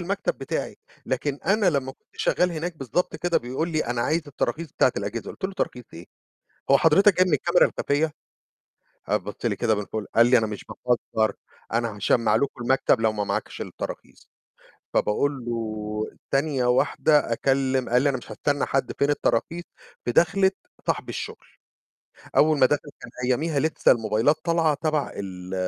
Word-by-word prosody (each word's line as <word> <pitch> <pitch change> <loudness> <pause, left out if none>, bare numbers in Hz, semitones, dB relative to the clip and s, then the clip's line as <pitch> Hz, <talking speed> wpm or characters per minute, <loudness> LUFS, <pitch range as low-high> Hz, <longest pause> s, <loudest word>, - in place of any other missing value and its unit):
المكتب 195 +3 -2
بتاعي، 135 - -3 0.3
لكن 135 +2 -2
أنا 205 +1 +3
لمّا 135 -3 -1
كنت - - -36
شغال 180 0 +1
هناك 165 +1 -4
بالضبط 155 +5 -2
كده 175 +2 +1
بيقول 130 +7 -3
لي: 155 -2 0
"أنا 120 0 -1
عايز 160 +6 +1
التراخيص 150 +2 -3
بتاعة 130 - +3
الأجهزة" 100 +4 -4
قُلت - - -9
له: 195 - -1
"تراخيص 125 -10 -3
إيه؟ 85 +2 -10 0.7
هو 140 - +8
حضرتك 190 +7 +5
جاي 185 - +5
من 180 - 0
الكاميرا 170 +5 +4
الخفية؟" 150 +2 0 0.9
قام - - +2
بص - - -7
لي - - +1
كده 110 -2 +1
من 105 -1 -3
فوق 110 +1 -4
قال 115 +1 +6
لي: 125 0 +6
"أنا 110 -2 +1
مش 105 -1 -7
باهزر، 115 -3 -1 0.4
أنا 115 -2 0
هاشمع 105 +2 +2
لكم 140 -3 -1
المكتب 130 -2 +2
لو 110 -1 +3
ما 105 -1 -2
معاكش - - -3
التراخيص" - - -8 0.6
فباقول 135 +4 0
له، 110 -2 -4
ثانية 135 -2 +1
واحدة 140 +1 +3
أكلم 135 +1 +1
قال 125 +1 +4
لي: 145 - +3
"أنا 135 - -1
مش 120 - -11
هاستنى 145 +6 0
حد، 135 - -1
فين 140 - +3
التراخيص؟" 155 +4 0 0.4
في 120 - +1
دخلة 190 +7 +4 0.4
صاحب - - -1
الشُّغل، - - -5 1.0
أول 155 -1 +5
ما 130 - +7
دخل، 145 +2 0
كان - - -10 0.2
أياميها 145 +4 +1
لسه 155 +3 +3
الموبايلات 115 +5 +2
طالعة 165 -2 +2
تبع 155 0 -1
ال 95 -2 -7
135 Hz, 170 wpm, -25 LUFS, 115-155 Hz, 1.0 s, هو